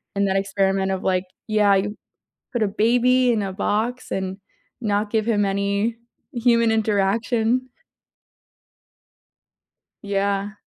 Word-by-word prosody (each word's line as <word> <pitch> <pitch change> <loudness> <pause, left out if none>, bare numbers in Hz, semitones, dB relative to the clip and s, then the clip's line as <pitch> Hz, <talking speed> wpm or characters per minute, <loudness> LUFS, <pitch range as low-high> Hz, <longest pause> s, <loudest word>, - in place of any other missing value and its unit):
and 200 0 +1
that 190 - 0
experiment 195 -1 0
of 190 -1 -3
like 185 0 +1 0.2
yeah, 210 -2 +3
you 205 +2 -1 0.6
put 240 - 0
a 210 - +2
baby 245 +4 +3
in 220 -3 0
a 195 -1 -3
box 220 +5 -2
and 190 0 -3 0.4
not 210 -2 -1
give 220 -1 0
him 210 -3 +2
any 200 +3 0 0.4
human 235 -2 +3
interaction. 225 +4 +1 2.3
Yeah. 200 0 -1
205 Hz, 120 wpm, -22 LUFS, 195-230 Hz, 2.3 s, yeah